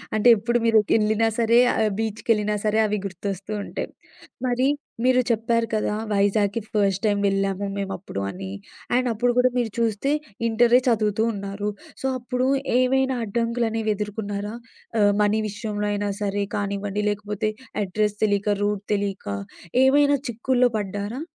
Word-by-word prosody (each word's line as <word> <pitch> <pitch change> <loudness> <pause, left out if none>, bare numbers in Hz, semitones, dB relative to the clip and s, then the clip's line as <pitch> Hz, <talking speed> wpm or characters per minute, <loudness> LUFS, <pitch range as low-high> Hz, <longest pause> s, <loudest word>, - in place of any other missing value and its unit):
అంటే 215 +2 +3
ఎప్పుడు 235 +3 0
మీరు 225 -1 +5 0.2
ఎళ్ళినా 215 +1 +2
సరే, 230 +1 +5
ఆహ్, 220 - +2
బీచ్‌కెళ్ళినా 215 -1 0
సరే, 215 +1 +2
అవి 210 - -1
గుర్తొస్తుంటాయి. 200 +2 -4 0.6
మరి 250 +2 +2 0.4
మీరు 255 0 +5
చెప్పారు 230 +1 +1
కదా, 210 -1 0 0.2
వైజాగ్‌కి 205 +2 +2
ఫస్ట్ 200 -2 +1
టైమ్ 205 -1 +2
వెళ్ళాము 195 0 0
మేమప్పుడు 195 - -4
అని. 95 0 -6 0.4
అండ్ 255 0 +2
అప్పుడు 240 +3 +1
గూడా 250 +1 +5
మీరు 230 -3 -1
చూస్తే, 230 +4 0 0.4
ఇంటరే 235 +2 +5
చదువుతూ 220 -2 +2
ఉన్నారు. 200 +1 -4 0.3
సో, - - -4
అప్పుడు 250 +1 -1 0.3
ఏమైనా 265 0 +2
అడ్డంకులనేవి 225 0 -1
ఎదుర్కున్నారా? 205 0 -4 0.5
ఆహ్, 205 0 +5
మనీ 215 +1 +2
విషయంలో 210 0 -3
అయినా 205 0 -1
సరే 205 0 0
కానివ్వండి, 200 0 -2
లేకపోతే 210 0 -2 0.3
అడ్రెస్ 210 +2 -1
తెలియక 205 0 +1
రూట్ 205 -1 -1
తెలియక 200 -1 -2 0.6
ఏమైనా 285 +1 +5
చిక్కుల్లో 245 +2 +2
పడ్డారా? 205 +5 -4
210 Hz, 130 wpm, -24 LUFS, 200-230 Hz, 0.6 s, మీరు